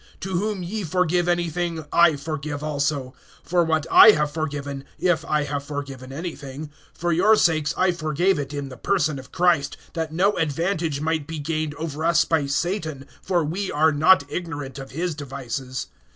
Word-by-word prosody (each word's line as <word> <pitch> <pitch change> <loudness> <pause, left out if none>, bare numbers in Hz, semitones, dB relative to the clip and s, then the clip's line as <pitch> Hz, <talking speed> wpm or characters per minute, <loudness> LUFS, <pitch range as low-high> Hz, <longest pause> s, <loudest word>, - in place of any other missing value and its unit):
(10)To 190 - -4
whom 195 +1 -1
ye 205 +4 -4
forgive 175 0 +1
anything, 175 -2 -1
I 170 -2 +6
forgive 145 0 -5
also; 140 -3 -1 0.3
for 175 0 +2
what 160 -2 0
I - - +10
have 150 -3 0
forgiven, 145 -3 -4
if 175 -3 +1
I 150 -2 +1
have 145 -1 -3
forgiven 140 -3 -6
anything, 150 -2 -6 0.2
for 175 +1 -2
your 200 +7 +5
sakes 160 -6 +2
I 185 0 +3
forgave 170 +1 +1
it 140 -1 -4
in 145 -2 -4
the 130 - -10
person 155 -8 0
of 135 +1 -13
Christ, 170 -5 +2 0.2
(11)that 160 -2 -2
no 185 +6 +2
advantage 165 -1 -1
might 160 -2 -1
be 165 - -5
gained 155 0 -2
over 160 -1 -5
us 170 0 +4
by 160 -4 +1
Satan; 155 -1 -2 0.2
for 175 -3 +1
we 185 +6 -3
are 155 +2 +3
not 155 +2 +5
ignorant 145 -4 -5
of 135 0 -8
his 170 +4 -2
devices. 135 -2 -5
155 Hz, 175 wpm, -23 LUFS, 145-175 Hz, 0.3 s, I